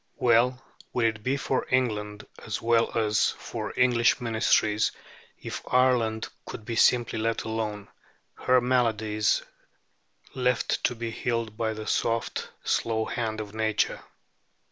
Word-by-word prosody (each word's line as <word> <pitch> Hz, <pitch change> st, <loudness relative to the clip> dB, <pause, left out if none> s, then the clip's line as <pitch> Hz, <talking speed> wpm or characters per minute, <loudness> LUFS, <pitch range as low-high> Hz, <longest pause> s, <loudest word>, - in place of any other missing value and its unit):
Well 125 Hz, +1 st, +3 dB, 0.3 s
would 120 Hz, -2 st, +1 dB
it 110 Hz, -1 st, 0 dB
be 130 Hz, +5 st, 0 dB
for 135 Hz, -1 st, -1 dB
England, 105 Hz, -5 st, -1 dB, 0.2 s
as 110 Hz, -, -3 dB
well 115 Hz, 0 st, +2 dB
as 105 Hz, -2 st, +2 dB
for -, -, -5 dB
English 120 Hz, -2 st, +4 dB
Ministries, 110 Hz, -2 st, +2 dB, 0.5 s
if -, -, -6 dB
Ireland 125 Hz, -4 st, +2 dB, 0.2 s
could 110 Hz, -, -8 dB
be 115 Hz, -, -3 dB
simply 120 Hz, 0 st, +3 dB
let 115 Hz, +1 st, -1 dB
alone, 110 Hz, -2 st, -3 dB, 0.5 s
her 130 Hz, 0 st, +3 dB
maladies 110 Hz, -4 st, +1 dB, 0.9 s
left 125 Hz, -2 st, 0 dB
to 125 Hz, -, +1 dB
be 115 Hz, 0 st, -4 dB
healed 115 Hz, -2 st, -2 dB
by 110 Hz, -1 st, -1 dB
the 110 Hz, 0 st, -6 dB
soft, 115 Hz, +1 st, -1 dB
slow 110 Hz, -1 st, 0 dB
hand 110 Hz, -2 st, -3 dB
of 105 Hz, -1 st, -6 dB
nature. 110 Hz, -1 st, 0 dB
115 Hz, 130 wpm, -27 LUFS, 110-120 Hz, 0.9 s, English